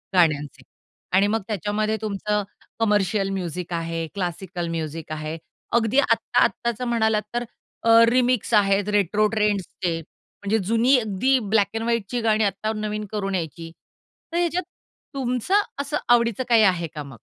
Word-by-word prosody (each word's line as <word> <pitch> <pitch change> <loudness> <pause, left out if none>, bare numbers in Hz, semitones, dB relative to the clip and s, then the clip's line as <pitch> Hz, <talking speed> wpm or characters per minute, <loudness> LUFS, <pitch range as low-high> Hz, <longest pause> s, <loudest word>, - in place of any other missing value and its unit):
गाण्यांचे. 150 -5 +2 0.5
आणि 195 +2 +4
मग 220 +2 0
त्याच्यामध्ये 215 +2 -1
तुमचं 210 0 -1 0.4
कमर्शियल 205 -2 +1
म्युझिक 180 -2 -4
आहे, 165 0 -2
क्लासिकल 180 -1 -3
म्युझिक 160 -1 -5
आहे. 155 +1 -4 0.4
अगदी 235 +3 +3
आत्ता-आत्ताचं 235 -3 +1
म्हणालात 220 -2 +2
तर, 240 0 -1 0.4
अ, 230 - +2 0.2
रिमिक्स 250 -2 +1
आहेत 200 -1 +3
रेट्रो 210 +3 +2
ट्रेंड्सचे. 195 -5 -1 0.4
म्हणजे 205 +2 +1
जुनी 235 +4 +4
अगदी 230 +5 +1 0.2
ब्लॅक 205 -3 +4
अँड 225 - -2
व्हाईटची 235 0 -1
गाणी 220 -1 +2
आत्ता 200 +2 -1
नवीन 215 0 -3
करून 195 -2 -2
यायची. 165 -1 -5 0.6
तर 340 - -2
ह्याच्यात 350 +1 0 0.5
तुमचं 265 - +1 0.2
असं 285 +1 -2
आवडीचं 235 0 +3
काही 230 -2 +6
आहे 180 -4 +2
का 150 - -4
मग? 135 -4 -12
210 Hz, 140 wpm, -23 LUFS, 180-230 Hz, 0.6 s, काही